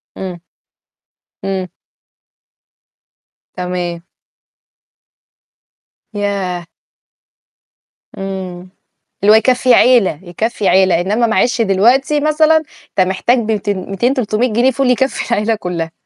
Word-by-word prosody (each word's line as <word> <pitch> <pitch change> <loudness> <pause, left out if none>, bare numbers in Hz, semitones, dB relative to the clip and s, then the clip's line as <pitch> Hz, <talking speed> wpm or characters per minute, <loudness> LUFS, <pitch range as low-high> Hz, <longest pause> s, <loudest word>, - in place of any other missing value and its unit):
امم. 180 -3 -7 1.0
إمم. 190 -1 -2 1.9
تمام. 180 -2 -4 2.1
ياه! 195 -4 -3 1.5
إمم. 185 -2 -6 0.5
اللي 205 - +6
هو 220 - +8
يكفي 250 +2 +3
عيلة، 235 - +4
يكفي 205 +4 -3
عيلة، 185 -2 +3
إنما 215 +6 +1
معلش 230 +3 +1
دلوقتي 240 +9 +2
مثلًا 310 +1 +3 0.3
أنت 185 -1 +1
محتاج 195 +7 +1
ب200، 205 -3 -3
200، 240 +7 +1
300 230 -2 -1
جنيه 245 +4 +3
فول 265 0 0
يكفي 265 -1 0
العيلة 220 0 +1
كلّها. 170 -4 -4
205 Hz, 95 wpm, -16 LUFS, 185-245 Hz, 2.1 s, هو